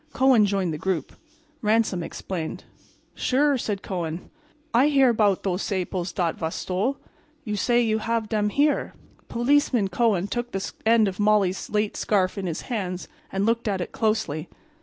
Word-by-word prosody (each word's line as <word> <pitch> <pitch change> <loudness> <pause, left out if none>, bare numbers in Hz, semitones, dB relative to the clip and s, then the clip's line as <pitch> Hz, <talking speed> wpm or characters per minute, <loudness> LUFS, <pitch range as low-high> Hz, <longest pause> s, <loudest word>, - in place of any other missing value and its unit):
Kohen 255 -5 +5
joined 190 -4 0
the 155 - -5
group. 180 -6 -2 0.5
Ransom 215 -4 +2
explained. 165 -1 -5 0.5
"Sure," 280 +2 +2
said 210 -5 -3
Kohen. 170 -3 -4 0.4
"I 255 +5 +5
hear 275 -3 +5
about 210 -4 +2
those 190 0 -1
saples 185 -2 -2
dat 170 -3 -1
vas 160 0 -2
stole. 205 +10 -1 0.5
You 210 -5 -3
say 240 +4 +2
you 220 -1 +1
have 230 0 -1
dem 210 -1 0
here?" 290 +6 +1 0.3
Policeman 240 -4 +2
Kohen 210 -5 +2
took 240 +4 -4
the 195 0 -3 0.2
end 225 -2 +5
of 190 0 -4
Molly's 205 -3 +2
late 210 0 0
scarf 190 -3 +1
in 195 -3 -3
his 165 -1 -3
hands 185 -6 -4 0.2
and 195 +1 0
looked 230 +1 +1
at 195 -2 0
it 175 - -4
closely. 215 -8 -1
210 Hz, 160 wpm, -25 LUFS, 185-230 Hz, 0.5 s, Kohen